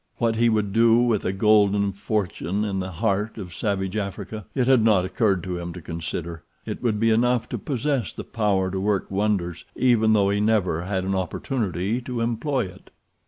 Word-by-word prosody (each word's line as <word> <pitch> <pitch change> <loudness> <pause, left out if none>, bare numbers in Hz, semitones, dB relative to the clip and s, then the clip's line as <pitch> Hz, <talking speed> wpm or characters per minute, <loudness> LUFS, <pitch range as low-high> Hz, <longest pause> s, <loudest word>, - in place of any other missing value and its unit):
What 115 -2 +1
he 120 +1 +4
would 105 -3 0
do 115 +1 +5
with 120 -4 +2
a 95 - +1
golden 100 0 +3
fortune 100 -1 -2
in 100 -2 -2
the 95 0 -3
heart 100 +5 -1
of 90 -5 -7
savage 95 +2 -2
Africa 100 0 -5
it 130 -3 +2
had 130 -2 +5
not 105 -5 +4
occurred 95 -1 +1
to 90 -1 -4
him 85 0 -5
to 90 - -8
consider—it 85 0 -6
would 110 -4 0
be 115 +1 +3
enough 120 +1 +2
to 120 - -3
possess 135 -2 -1
the - - -7
power 100 -4 0
to 95 - -2
work 100 0 -1
wonders, 95 -4 -1
even 110 -4 +3
though 100 -2 +3
he 100 0 +1
never 105 -7 +1
had 95 -1 -1
an 95 +1 -1
opportunity 100 - -2
to 125 -1 -4
employ 120 +2 0
it. 90 - -13
105 Hz, 190 wpm, -24 LUFS, 95-115 Hz, -, do